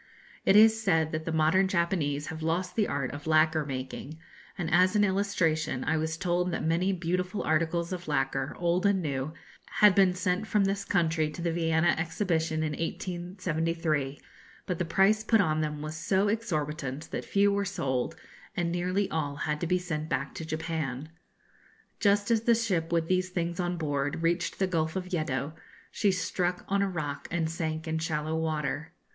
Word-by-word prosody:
It 195 Hz, -, +5 dB
is 220 Hz, +1 st, +7 dB
said 160 Hz, -6 st, +2 dB
that 160 Hz, 0 st, -3 dB
the 165 Hz, -, -2 dB
modern 160 Hz, +4 st, +3 dB
Japanese 170 Hz, -6 st, 0 dB
have 160 Hz, -, -7 dB
lost 170 Hz, +3 st, -1 dB
the 215 Hz, -3 st, +2 dB
art 140 Hz, -3 st, -2 dB
of 145 Hz, +2 st, -8 dB
lacquer 155 Hz, 0 st, +4 dB
making; 135 Hz, +3 st, -5 dB, 0.4 s
and 175 Hz, -4 st, -2 dB
as 185 Hz, +3 st, +5 dB
an 205 Hz, -, +4 dB
illustration 175 Hz, -9 st, +1 dB
I 160 Hz, -, +1 dB
was 160 Hz, +1 st, -2 dB
told 180 Hz, 0 st, 0 dB
that 170 Hz, -, -2 dB
many 170 Hz, +4 st, +2 dB
beautiful 180 Hz, +2 st, -2 dB
articles 165 Hz, +2 st, 0 dB
of 175 Hz, -2 st, -6 dB
lacquer, 135 Hz, -1 st, -1 dB
old 175 Hz, +3 st, +2 dB
and 200 Hz, -1 st, +3 dB
new, 140 Hz, -3 st, -2 dB, 0.4 s
had 210 Hz, -2 st, +6 dB
been 185 Hz, -2 st, +4 dB
sent 185 Hz, +3 st, -1 dB
from 210 Hz, -2 st, +2 dB
this 195 Hz, +1 st, -1 dB
country 165 Hz, -4 st, +1 dB
to 165 Hz, +3 st, -7 dB
the 170 Hz, -, +1 dB
Vienna 165 Hz, 0 st, +2 dB
Exhibition 160 Hz, -2 st, 0 dB
in 155 Hz, -, -1 dB
1873, 165 Hz, -3 st, -2 dB, 0.5 s
but 180 Hz, -3 st, -3 dB
the 175 Hz, -, 0 dB
price 195 Hz, +5 st, +3 dB
put 225 Hz, 0 st, +3 dB
on 155 Hz, -5 st, +2 dB
them 150 Hz, -1 st, -3 dB
was 155 Hz, +1 st, -5 dB
so 190 Hz, +5 st, +1 dB
exorbitant 155 Hz, -, -3 dB
that -, -, -3 dB
few 200 Hz, 0 st, +3 dB
were 200 Hz, 0 st, +1 dB
sold, 135 Hz, -10 st, -2 dB, 0.4 s
and 170 Hz, -1 st, 0 dB
nearly 180 Hz, +3 st, 0 dB
all 145 Hz, -3 st, -1 dB
had 150 Hz, +1 st, -2 dB
to 170 Hz, -, -1 dB
be 180 Hz, +2 st, +2 dB
sent 160 Hz, -4 st, -4 dB
back 140 Hz, +2 st, -2 dB
to -, -, -6 dB
Japan. 155 Hz, -3 st, -3 dB, 0.9 s
Just 205 Hz, 0 st, +3 dB
as 225 Hz, -2 st, +3 dB
the 235 Hz, +1 st, +4 dB
ship 185 Hz, -8 st, -1 dB
with 165 Hz, -1 st, +1 dB
these 185 Hz, +1 st, +1 dB
things 175 Hz, 0 st, -2 dB
on 175 Hz, 0 st, -1 dB
board 145 Hz, 0 st, -2 dB
reached 170 Hz, +1 st, 0 dB
the 195 Hz, -, +2 dB
Gulf 160 Hz, -3 st, -1 dB
of 185 Hz, 0 st, -4 dB
Yeddo, 155 Hz, -3 st, -1 dB, 0.4 s
she 205 Hz, -3 st, +2 dB
struck 180 Hz, -1 st, -1 dB
on 200 Hz, +1 st, +1 dB
a 200 Hz, -, +1 dB
rock 150 Hz, -6 st, -4 dB
and 165 Hz, -1 st, 0 dB
sank 160 Hz, -1 st, -3 dB
in 160 Hz, 0 st, -1 dB
shallow 155 Hz, -1 st, -2 dB
water. 160 Hz, -1 st, -2 dB
165 Hz, 185 wpm, -29 LUFS, 155-185 Hz, 0.9 s, is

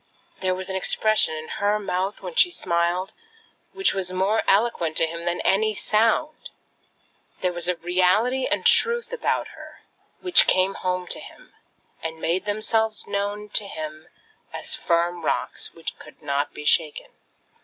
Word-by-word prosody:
There 185 Hz, -1 st, 0 dB
was 185 Hz, 0 st, -4 dB
an 190 Hz, -, -3 dB
expression 215 Hz, -2 st, +2 dB
in 155 Hz, 0 st, -7 dB
her 205 Hz, 0 st, 0 dB
mouth 195 Hz, -1 st, -2 dB
when -, -, -6 dB
she 460 Hz, -7 st, +5 dB
smiled, 175 Hz, -, -1 dB, 0.6 s
which 385 Hz, 0 st, +1 dB
was 185 Hz, -2 st, -2 dB
more 190 Hz, +4 st, +1 dB
eloquent 195 Hz, -6 st, +2 dB
to -, -, +5 dB
him 170 Hz, +1 st, -6 dB
than 175 Hz, 0 st, -1 dB
any 215 Hz, +2 st, +2 dB
sound. 225 Hz, +10 st, +1 dB, 0.9 s
There 180 Hz, -1 st, 0 dB
were 175 Hz, -, -5 dB
a 180 Hz, -, +2 dB
reality 185 Hz, +9 st, +2 dB
and -, -, 0 dB
a -, -, -19 dB
truth 475 Hz, +1 st, +3 dB
about -, -, -1 dB
her -, -, -13 dB, 0.4 s
which 365 Hz, -2 st, +4 dB
came 185 Hz, +1 st, +3 dB
home 180 Hz, -1 st, -2 dB
to -, -, -2 dB
him, -, -, -14 dB, 0.5 s
and 160 Hz, 0 st, -5 dB
made 180 Hz, +4 st, 0 dB
themselves 215 Hz, +1 st, 0 dB
known 205 Hz, +1 st, -3 dB
to 205 Hz, 0 st, +1 dB
him 155 Hz, -3 st, -7 dB, 0.4 s
as -, -, -4 dB
firm 170 Hz, 0 st, 0 dB
rocks -, -, -2 dB
which 165 Hz, -, -7 dB
could 155 Hz, -, -15 dB
not 140 Hz, 0 st, -1 dB
be 150 Hz, -, -9 dB
shaken. 155 Hz, -1 st, +1 dB
190 Hz, 160 wpm, -24 LUFS, 170-215 Hz, 0.9 s, she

